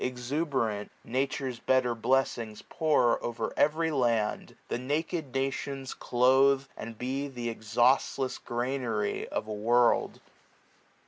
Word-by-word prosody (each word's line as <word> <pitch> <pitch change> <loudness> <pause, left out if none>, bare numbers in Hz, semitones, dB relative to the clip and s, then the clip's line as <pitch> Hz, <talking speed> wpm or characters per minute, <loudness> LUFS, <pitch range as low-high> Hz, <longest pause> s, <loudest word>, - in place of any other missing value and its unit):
Exuberant, 125 -4 -2
Nature's 130 0 -2
better 130 -1 +2
bleffings 115 -3 0
pour 150 -7 +2
O'er 120 0 -3
every 160 +2 +2
land; 120 -6 0
the - - -2
naked 150 +2 -2
nations 135 0 -3
cloathe; 130 +2 +4
75 135 - -23
And 115 -1 -9
be 135 +4 -3
th' 120 -3 -5
exhaustless 120 +4 +1
granary 120 -3 -2
of - - -3
a 110 - -4
world. 120 +3 +2
130 Hz, 115 wpm, -29 LUFS, 120-135 Hz, -, cloathe